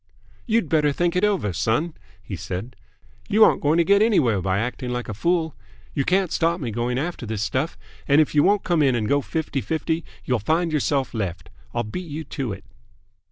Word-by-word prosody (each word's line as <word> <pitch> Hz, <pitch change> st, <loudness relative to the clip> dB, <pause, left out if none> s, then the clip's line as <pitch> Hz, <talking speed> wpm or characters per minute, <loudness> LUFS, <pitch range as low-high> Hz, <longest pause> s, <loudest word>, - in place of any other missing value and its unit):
"You'd 230 Hz, 0 st, +2 dB
better 150 Hz, -3 st, +3 dB
think 175 Hz, +4 st, 0 dB
it 180 Hz, -, +1 dB
over, 195 Hz, -, +1 dB
son," 115 Hz, -, 0 dB, 0.3 s
he -, -, -6 dB
said. 100 Hz, +7 st, -5 dB, 0.5 s
"You 215 Hz, +1 st, +6 dB
aren't -, -, +4 dB
going 150 Hz, +3 st, +3 dB
to 170 Hz, -, +5 dB
get 200 Hz, +4 st, +4 dB
anywhere 130 Hz, -, +3 dB
by 95 Hz, +1 st, 0 dB
acting 125 Hz, +3 st, -3 dB
like 125 Hz, 0 st, -3 dB
a 110 Hz, -, -4 dB
fool. 165 Hz, -, 0 dB, 0.4 s
You 135 Hz, -, 0 dB
can't 185 Hz, -2 st, +2 dB
stop 170 Hz, +1 st, +1 dB
me 120 Hz, -5 st, -3 dB
going 120 Hz, +3 st, -1 dB
after 150 Hz, -4 st, -3 dB
this 105 Hz, -2 st, -2 dB
stuff, 130 Hz, +9 st, -1 dB, 0.3 s
and 140 Hz, +1 st, +5 dB
if 155 Hz, -, +2 dB
you 150 Hz, -, +5 dB
won't 200 Hz, +4 st, +3 dB
come 170 Hz, -3 st, +2 dB
in 135 Hz, -4 st, +3 dB
and 110 Hz, -3 st, -1 dB
go 140 Hz, +4 st, +2 dB
fifty 145 Hz, -2 st, -2 dB
fifty, 160 Hz, +2 st, -1 dB, 0.2 s
you'll 125 Hz, -2 st, +1 dB
find 160 Hz, -, +1 dB
yourself 140 Hz, -3 st, 0 dB
left. 90 Hz, -6 st, -4 dB, 0.2 s
I'll 120 Hz, -, -1 dB
beat 165 Hz, +11 st, -6 dB
you 155 Hz, +2 st, -4 dB
to 135 Hz, -5 st, -4 dB
it." 100 Hz, -, -7 dB
145 Hz, 205 wpm, -23 LUFS, 120-170 Hz, 0.5 s, You